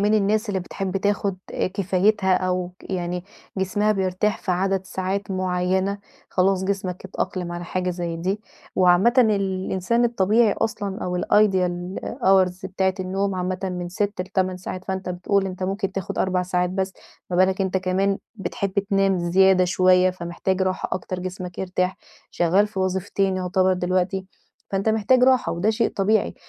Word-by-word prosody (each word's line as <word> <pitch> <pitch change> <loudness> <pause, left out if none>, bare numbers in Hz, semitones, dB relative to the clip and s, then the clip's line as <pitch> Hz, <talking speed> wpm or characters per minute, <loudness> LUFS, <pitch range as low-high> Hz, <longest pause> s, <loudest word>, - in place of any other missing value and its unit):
...من 210 +2 +3
الناس 215 +2 +1
اللي 190 -2 -1
بتحب 190 +1 -4
تاخد 200 -1 0 0.4
كفايتها 195 0 +2
أو 180 -1 -1
ك - - -12
يعني 180 -1 -2 0.3
جسمها 205 +3 +1
بيرتاح 190 +1 0
في 190 - -4
عدد 190 +1 0
ساعات 190 +2 -3
معيّنة. 185 +1 0 0.3
خلاص 190 0 +2
جسمك 190 -2 -3
اتأقلم 180 -2 -3
على 175 0 -5
حاجة 180 0 -2
زي 170 -1 -3
دي. 190 +5 -2 0.4
وعامةً 185 +5 +5
الإنسان 195 0 +2
الطبيعي 220 -1 +3
أصلًا 205 -3 -3
أو 180 0 -2
الideal 185 -3 +1 0.2
hours 190 -1 +3
بتاعة 190 0 0
النوم 195 +1 -1
عامةً 185 0 -2
من 180 -1 -3
6 200 +1 -2
ل8 185 0 -1
ساعات. 185 0 -6
فأنت 190 -1 -4
بتقول 190 +2 0
أنت 185 0 -6
ممكن 195 +1 -2
تاخُد 195 -2 -4
4 185 -1 +1
ساعات 180 0 0
بس. 190 0 -2 0.4
ما 175 - 0
بالك 185 +1 +3
أنت 190 -1 0
كمان 190 +1 +1 0.2
بتحب 195 -1 -3 0.2
تنام 195 -1 +3
زيادة 185 +2 +4
شويّة، 185 0 +4
فمحتاج 185 +2 -2
راحة 185 0 -1
أكتر 185 0 -3
جسمك 180 -1 -6
يرتاح. 185 0 -1 0.3
شغّال 185 +5 +3
في 210 -2 -8
وظيفتين 190 +1 0
يعتبر 185 0 +2
دلوقتي. 185 +1 0 0.4
فأنت 195 +2 0
محتاج 220 +4 +3
راحة 260 -1 +3
وده 185 +6 +1
شيء 225 +1 +1
طبيعي. 205 +2 +1
190 Hz, 155 wpm, -23 LUFS, 180-195 Hz, 0.4 s, وعامةً